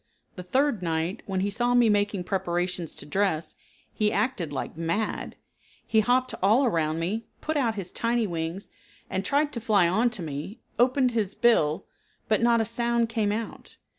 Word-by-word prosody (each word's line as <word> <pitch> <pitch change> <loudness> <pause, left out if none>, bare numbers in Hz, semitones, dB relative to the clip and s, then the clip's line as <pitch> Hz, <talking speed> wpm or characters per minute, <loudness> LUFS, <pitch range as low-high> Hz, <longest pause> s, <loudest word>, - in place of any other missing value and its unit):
The 180 - -6
third 255 +4 +1
night, 165 +4 -1
when 190 -1 -1
he 200 +1 0
saw 240 +3 +1
me 240 -1 +5
making 205 -2 +1
preparations 175 -2 -2
to - - -7
dress, 165 -2 0 0.4
he 210 -1 +1
acted 205 - -1
like 140 - -4
mad. 170 +7 -2 0.5
He 220 - +3
hopped 255 +3 +2
all 220 +8 +4
around 160 -8 +1
me, 200 +7 -2
put 315 - -3
out 240 -6 +1
his 190 -3 -5
tiny 235 -1 0
wings, 170 +1 -4 0.4
and 190 0 -1
tried 290 +5 +1
to 235 - -4
fly 205 -5 +3
onto 220 +2 +1
me, 155 - -6 0.2
opened 255 +1 +3
his 215 -5 -1
bill, 160 -10 +3 0.4
but 215 - +2
not 235 0 +4
a - - 0
sound 235 0 0
came 220 -3 0
out. 225 +2 -5
210 Hz, 170 wpm, -26 LUFS, 175-235 Hz, 0.5 s, me